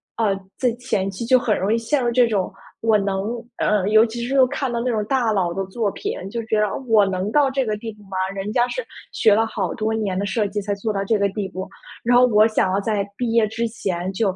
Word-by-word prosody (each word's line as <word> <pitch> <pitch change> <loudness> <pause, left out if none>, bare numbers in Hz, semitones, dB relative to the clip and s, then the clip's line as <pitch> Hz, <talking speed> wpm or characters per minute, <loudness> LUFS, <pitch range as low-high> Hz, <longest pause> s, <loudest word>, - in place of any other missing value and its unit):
呃， 215 -3 +1 0.2
在 250 -2 +1
前 195 -6 -1
期 195 +5 -5
就 255 +2 +5
很 225 -4 +1
容 195 +3 0
易 225 - +3
陷 240 +4 0
入 240 - +2
这 245 +1 +5
种， 200 -5 -1 0.3
我 225 -1 +4
能 195 -1 -1 0.4
呃， 205 -2 +1
尤 220 +1 +6
其 235 +1 -3
是 265 +1 +4
看 260 0 -3
到 235 - -1
那 245 +2 -1
种 220 -3 0
大 240 -2 +1
佬 180 -4 0
的 195 +2 -2
作 205 +2 -2
品， - - -4 0.2
就 235 - -2
觉 220 -1 +1
得： 210 - +3 0.2
“我 215 -2 +6
能 190 +2 -2
到 285 -2 +3
这 270 0 0
个 215 -2 -1
地 225 +1 -6
步 210 - -19
吗？ 195 -1 -7 0.2
人 195 +2 -4
家 240 +2 +2
是 - - -4 0.3
学 215 -2 +4
了 225 +1 +3
好 200 -5 -3
多 220 0 -1
年 205 -4 -1
的 200 - -1
设 210 +1 0
计 205 +1 -3
才 205 0 -2
做 200 +2 -2
到 195 -1 -1
这 215 +1 +1
个 200 0 +2
地 200 0 -3
步”。 190 +1 -6 0.3
然 245 +1 +4
后 250 - +7
我 215 -3 +5
想 205 -4 +1
要 195 - +2
在 205 -2 -1
毕 235 0 -2
业 230 -1 +4
之 230 +2 -2
前 190 -5 -3
就 195 -1 0
215 Hz, 280 characters per minute, -22 LUFS, 195-235 Hz, 0.4 s, 后